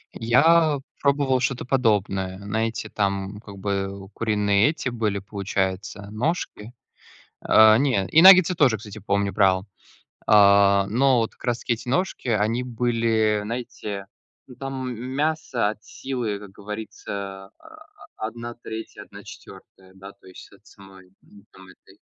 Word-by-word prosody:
Я 145 +6 +3 0.2
пробовал 140 -2 +2
что-то 130 0 -2
подобное, 100 -7 0
знаете, 110 +3 -3
там, 100 0 -2
как 100 -3 -12
бы, 100 0 -4
куриные 105 +1 +2
эти 155 -4 -3
были, 110 -4 -2
получается, 100 0 -4
ножки. 120 -3 -3 0.7
Э, 110 0 +6
не, 125 -9 +1
и 160 - +5
наггетсы 185 -1 +8
тоже, 135 -9 +3
кстати, 110 0 -10
помню 100 0 -1
брал, 95 -2 +3 0.7
э, - - +1 0.5
но 125 +4 +2
вот, 115 - -2
как - - -21
раз-таки, 120 -1 -1
эти 115 - -12
ножки, 175 -2 -2
они 110 +2 +1
были, 115 -3 0
знаете, 105 -4 -6 0.4
ну 125 - -14
там 135 -1 -5
мясо 130 -1 -2
от 110 0 -11
силы 120 -6 -4
как 100 -1 -12
говорится, 100 -1 -7
а, - - -20 0.7
а, - - -4
1/3-1/4, 115 -4 -11
да 95 +1 -12
то 100 - -24
есть 95 - -13
от - - -21
самой, 95 -2 -17
ну, 100 -1 -19
там 95 0 -16
этой. - - -20
110 Hz, 135 wpm, -23 LUFS, 100-125 Hz, 0.7 s, наггетсы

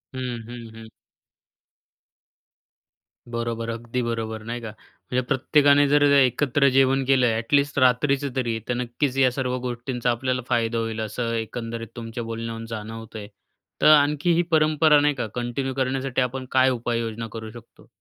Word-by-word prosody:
हं, 125 -3 -4
हं. 120 -2 -9
हं. 115 0 -11 2.4
बरोबर, 115 -1 -3
अगदी 115 +2 -3
बरोबर 110 -2 -3
नाही 120 +1 -5
का. 115 - -6 0.4
म्हणजे 125 0 +2
प्रत्येकाने 145 +1 +4
जर 145 +1 +4
एकत्र 140 +1 +3
जेवण 135 +1 +3
केलं, 135 -1 +3
एटलीस्ट 140 +6 +1
रात्रीचं 135 +2 +2
तरी 120 -3 -1
तर, - - +2
नक्कीच 125 +3 -2
या 130 -2 +4
सर्व 125 -1 -2
गोष्टींचा 120 0 -2
आपल्याला 125 +1 -1
फायदा 115 -1 +1
होईल. 115 -1 -3
असं 115 +2 -3
एकंदरीत 115 0 -5
तुमच्या 115 0 -6
बोलण्यावरून 115 0 -5
जाणवतंय. 110 -1 -7 0.5
तर - - +5
आणखी 150 +3 +2
ही 170 - +3
परंपरा 155 -1 +4
नाही 145 0 +2
का 125 -4 -3
कंटिन्यू 125 +2 -3
करण्यासाठी 130 0 -1
आपण 130 +1 -2
काय 130 0 +4
उपाययोजना 115 -2 -2
करू 110 -1 -7
शकतो? 120 0 -15
125 Hz, 145 wpm, -24 LUFS, 115-135 Hz, 2.4 s, तर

